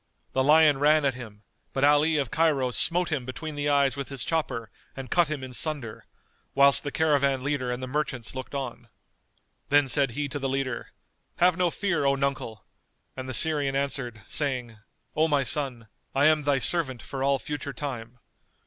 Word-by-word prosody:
The 130 - +2
lion 150 -1 +5
ran 150 +1 +4
at 135 - +2
him, 110 -4 -11 0.3
but 135 - -1
Ali 150 +2 +4
of 140 -5 -2
Cairo 150 -6 +1
smote 175 +7 +2
him 145 -5 -1
between 150 +5 -6
the 145 0 -2
eyes 140 -3 +2
with 140 -1 -6
his 135 -3 -4
chopper 135 -9 -2 0.3
and 130 -2 -8
cut 175 -2 +3
him 150 -3 -4
in 130 -1 -8
sunder, 135 -6 -3 0.5
whilst 140 0 +6
the 145 - -4
caravan 140 -4 +1
leader 135 -2 -2
and 125 +1 -4
the - - -4
merchants 130 -4 -3
looked 130 +2 -7
on. 125 -3 -5 0.8
Then 145 -1 +4
said 140 0 +2
he 145 -1 -1
to 145 - -4
the 135 -1 -2
leader, 130 -2 -3 0.4
"Have 180 0 +3
no 180 0 +1
fear, 190 -3 -1
O 140 0 +3
nuncle!" 135 -6 -3 0.5
and 130 0 -7
the - - -4
Syrian 145 -4 +3
answered, 135 -6 -3
saying, 125 -6 -2 0.4
"O 155 +1 +3
my 145 -3 +1
son, 130 -5 -1 0.3
I 140 +2 +3
am 155 0 +4
thy 145 -1 +1
servant 130 -4 +1
for 135 -1 -5
all 140 0 +2
future 145 +1 -5
time." 125 -3 -6
140 Hz, 185 wpm, -26 LUFS, 130-150 Hz, 0.8 s, whilst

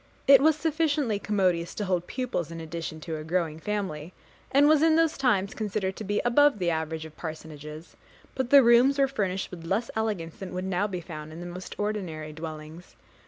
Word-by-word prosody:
It 275 0 +8
was 315 +1 +5
sufficiently 300 -8 0
commodious 185 -5 0
to 210 - -2
hold 180 -2 -1
pupils 250 - -3
in 165 0 -7
addition 160 -1 -6
to 160 0 -4
a 155 - -6
growing 160 -1 -1
family, 185 -5 -4 0.4
and 285 +2 +5
was 305 -1 +5
in 320 0 +5
those 330 -1 +3
times 210 -7 +1
considered 200 -3 -2
to - - -5
be 205 0 0
above 290 +2 +4
the 175 -3 0
average 160 0 -3
of 155 -1 -12
parsonages; 155 0 -8 0.4
but 260 -2 -2
the 280 -1 +8
rooms 240 +4 +5
were 275 -1 +4
finished 195 -7 -2
with 175 -2 -9
less 220 +8 -1
elegance 205 -7 -2
than 185 -2 -7
would 185 +1 -3
now 190 +2 0
be 185 -3 -5
found 155 -2 -8
in 160 - -9
the 175 - -7
most 180 +1 -8
ordinary 180 -8 -3
dwellings. 155 +1 -9
185 Hz, 200 wpm, -27 LUFS, 160-235 Hz, 0.4 s, It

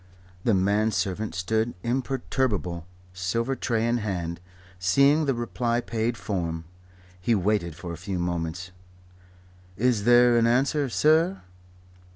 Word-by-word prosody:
The 115 - +3
man 100 +3 +2
servant 105 -1 -2
stood 110 +6 -1
imperturbable, 120 -8 -1 0.3
silver 115 +9 -1
tray 115 -3 0
in 120 +1 +2
hand. 90 -6 -3 0.4
Seeing 140 - +4
the 135 -3 +1
reply 120 0 -1
paid 115 -1 -2
form, 85 -5 -3 0.6
he 110 +6 +1
waited 95 -4 0
for 85 0 -7
a - - -7
few 95 +2 -4
moments. 85 +1 -3 1.1
"Is 115 -2 +1
there 120 0 +6
an 115 - +3
answer, 135 +3 +2
sir?" 160 +8 +2
110 Hz, 125 wpm, -26 LUFS, 90-120 Hz, 1.1 s, there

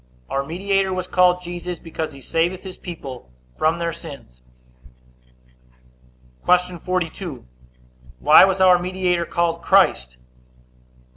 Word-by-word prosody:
A. - - -9
Our 135 0 0
mediator 195 +5 -1
was 185 -1 -2
called 180 0 +2
Jesus, 175 0 -6
because 160 -1 -5
he 140 -2 -13
saveth 170 +6 -1
his 190 -2 -8
people 135 - -9 0.3
from 160 +2 +1
their 170 -1 -2
sins. 140 - -12 2.0
Q. 180 -1 +2
42. 175 - -4 0.7
Why 60 - +7
was 190 0 +2
our 185 -1 +6
mediator 180 -1 -1
called 170 -1 -1
Christ? 65 - +2
175 Hz, 120 wpm, -21 LUFS, 160-185 Hz, 2.0 s, Why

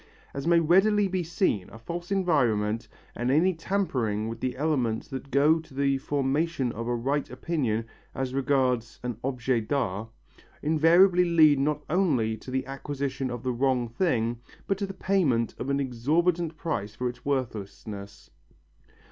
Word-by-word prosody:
As 140 +3 -4
may 170 0 +5
readily 195 +5 +4
be 185 -1 -1
seen, 165 - 0
a - - -11
false 170 +10 -6
environment 120 - +1 0.3
and 120 +1 -1
any 165 +7 +4
tampering 130 - -1
with 115 0 -5
the 130 +1 -3
elements 130 -7 0
that 135 +1 -6
go 150 +4 +4
to 160 -4 -14
the 140 -1 +1
formation 140 0 0
of 115 +1 -5
a 120 - 0
right 135 +4 -1
opinion 125 -5 -1 0.3
as 130 -1 -2
regards 130 -4 0
an 120 -3 -3
objet 125 -3 -1
d'art, 110 -5 -1 0.5
invariably 170 +4 +5
lead 155 -4 +5
not 150 +1 0
only 140 - +1
to 110 - -11
the 130 0 -1
acquisition 135 -1 -3
of 120 0 -5
the 130 -1 -1
wrong 125 -1 +1
thing 120 -4 0 0.3
but 195 -1 -1
to 200 - -1
the 195 - -6
payment 160 - +1
of 130 - -3
an 140 0 +1
exorbitant 160 +7 0
price 105 -10 -3
for 125 - -2
its 120 - -7
worthlessness. 105 -6 -5
135 Hz, 155 wpm, -27 LUFS, 120-165 Hz, 0.5 s, may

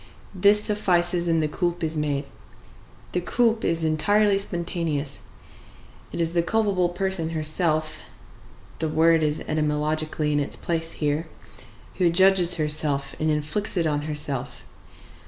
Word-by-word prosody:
this 205 +2 +4
suffices, 175 -4 +2
and 165 -1 +1
the - - +1
coulpe 175 +2 -2
is 160 0 -2
made. 145 -2 -2 0.9
The 180 - -1
coulpe 230 +4 +1
is 165 -1 0
entirely 200 +6 +2
spontaneous; 170 -6 -1 0.9
it - - -6
is 165 0 0
the 170 - +2
culpable 190 -1 0
person 180 -2 -1
herself 155 0 0 0.8
(the 160 - -1
word 160 +1 +3
is 150 0 0
etymologically 155 0 -1
in 145 - +1
its 145 - 0
place 165 -1 -2
here) 150 +2 -2 0.7
who 180 -2 +3
judges 180 0 +5
herself 150 -3 -1
and 155 - 0
inflicts 155 +8 0
it 170 - +1
on 150 0 -2
herself. 140 -4 -4
165 Hz, 135 wpm, -24 LUFS, 150-180 Hz, 0.9 s, judges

